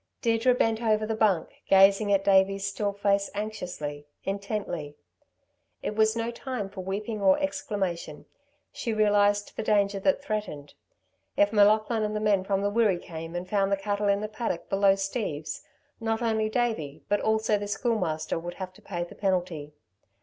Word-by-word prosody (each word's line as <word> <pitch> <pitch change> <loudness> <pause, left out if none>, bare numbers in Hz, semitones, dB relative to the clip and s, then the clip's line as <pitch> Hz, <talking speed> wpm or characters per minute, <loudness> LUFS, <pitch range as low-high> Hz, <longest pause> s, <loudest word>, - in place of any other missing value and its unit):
Deirdre 230 +1 +3
bent 225 -2 +1
over 215 -2 +2
the 220 - -2
bunk, 210 -6 +2 0.2
gazing 195 +2 +5
at 195 -1 +3
Davey's 195 0 +3
still 200 +1 -1
face 200 0 +1
anxiously, 180 -9 -5 0.2
intently. 195 -7 -4 0.9
It 210 - -3
was 220 +1 +3
no 230 0 -2
time 235 -5 -5
for 195 -2 -6
weeping 205 +3 -4
or 190 -1 +5
exclamation. 190 - -3 0.5
She 265 -6 -3
realised 205 -1 +2
the - - -2
danger 200 -2 +2
that 280 +8 +2
threatened. 205 - -4 0.6
If 205 +2 +3
M'Laughlin 215 +2 +4
and 215 0 -1
the - - 0
men 205 -3 +2
from 195 0 0
the 205 - +1
Wirree 210 -4 +3
came 165 -1 -8
and 175 +1 -4
found 200 -1 +1
the 200 - +2
cattle 205 +1 -1
in 200 0 +2
the 215 - -2
paddock 215 -5 -4
below 195 0 +4
Steve's, 195 - -3 0.4
not 225 0 -1
only 220 -1 +1
Davey, 215 - -2
but 205 - +1
also 220 -1 +1
the 205 - -4
Schoolmaster 185 -9 -1
would 175 +1 -7
have 185 -1 -6
to - - -18
pay 175 -3 -4
the 175 - -10
penalty. 180 -6 -2
205 Hz, 170 wpm, -27 LUFS, 190-215 Hz, 0.9 s, gazing